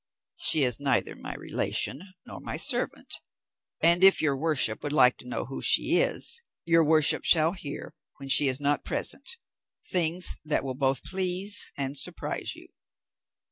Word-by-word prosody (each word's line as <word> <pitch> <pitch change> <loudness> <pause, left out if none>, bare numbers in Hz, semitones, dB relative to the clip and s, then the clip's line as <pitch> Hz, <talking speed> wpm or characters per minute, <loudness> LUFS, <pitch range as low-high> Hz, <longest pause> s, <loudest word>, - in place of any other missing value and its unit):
"She 160 - +3
is 125 -2 -1
neither 140 -1 -1
my - - -8
relation 135 - -3 0.2
nor - - -10
my - - -7
servant; - - 0 0.7
and 170 +3 +3
if 195 0 +7
your 145 -3 +1
worship 135 -6 +1
would 145 - -5
like 125 -4 +4
to - - -12
know - - -4
who 135 +2 -7
she - - +4
is, 470 - -1 0.2
your 165 0 +3
worship 155 -1 +2
shall 160 -1 +3
hear, 155 -6 -8 0.2
when 140 - -10
she 140 +1 +5
is 130 0 +2
not 145 0 -1
present, 470 - -2 0.5
things 175 0 +1
that 155 -2 -1
will 135 -1 -4
both 135 0 -1
please 190 +2 -1
and 140 0 -4
surprise - - -5
you." - - -15
150 Hz, 160 wpm, -26 LUFS, 135-170 Hz, 0.7 s, if